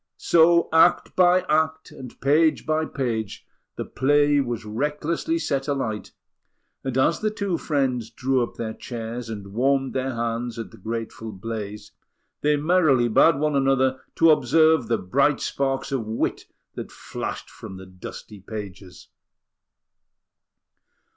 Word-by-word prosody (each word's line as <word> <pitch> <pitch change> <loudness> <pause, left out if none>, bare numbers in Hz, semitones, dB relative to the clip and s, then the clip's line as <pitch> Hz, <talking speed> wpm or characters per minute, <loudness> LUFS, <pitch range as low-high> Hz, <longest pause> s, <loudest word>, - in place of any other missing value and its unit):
So, 170 0 +4
act 160 - +4
by 180 0 +5
act, 160 0 0
and 125 -2 -11
page 155 +3 +3
by 155 0 +1
page, 115 -9 -3 0.3
the - - -4
play 145 +1 +3
was 120 -4 -4
recklessly 150 - -1
set 140 - -2
alight; 125 -7 -3 0.7
and 130 -1 -2
as 130 +5 +2
the 215 - 0
two 200 -5 -2
friends 130 -6 -1
drew 130 0 0
up 120 - -3
their 110 -1 -4
chairs 115 0 -6
and 100 -3 -7
warmed 135 +3 +1
their 130 -1 -2
hands 115 0 -3
at 115 - -6
the 110 - -14
grateful 115 +1 -5
blaze, 105 0 -6 0.5
they 150 0 +3
merrily 145 -6 +3
bade 155 +8 +5
one 150 +1 0
another 130 -1 +2
to 165 -1 +6
observe 155 -1 +4
the 115 0 +1
bright 135 +10 +1
sparks 135 0 -2
of 125 -5 -2
wit 110 +1 -2 0.3
that - - -7
flashed - - -6
from 95 - -10
the 95 - -10
dusty 95 +3 -10
pages! 100 -3 -9
130 Hz, 140 wpm, -24 LUFS, 115-150 Hz, 0.7 s, to